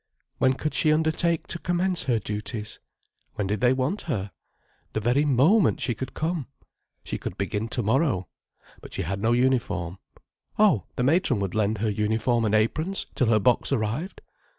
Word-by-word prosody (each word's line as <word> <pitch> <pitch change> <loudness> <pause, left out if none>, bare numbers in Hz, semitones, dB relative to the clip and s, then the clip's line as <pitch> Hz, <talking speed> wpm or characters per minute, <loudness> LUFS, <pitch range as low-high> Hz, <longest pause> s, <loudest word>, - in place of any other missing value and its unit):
When 130 0 +4
could 150 +2 -3
she 155 +2 +3
undertake 160 +1 +1
to 170 - -4
commence 175 -3 0
her 125 -3 +2
duties? 105 +1 -5 0.6
When 105 - -1
did 105 +4 -2
they 125 0 +5
want 130 +10 0
her? 100 -7 -2 0.6
The - - 0
very 125 +7 +2
moment 155 - +4
she 125 -3 0
could 130 +4 -7
come. 160 -3 -2 0.6
She - - -4
could 90 - -6
begin 105 +2 -2
tomorrow—but 120 - -3
she - - -2
had 100 +4 -3
no 110 +2 +2
uniform. 100 -8 0 0.6
Oh, 200 - +4
the 125 - -1
matron 145 - +2
would 95 -2 -2
lend 110 0 +1
her 110 +2 0
uniform 110 +3 +1
and 110 0 +2
aprons, 155 - 0
till 125 - +1
her 110 -1 +4
box 120 +6 +2
arrived. 130 - -2
120 Hz, 165 wpm, -25 LUFS, 105-155 Hz, 0.6 s, they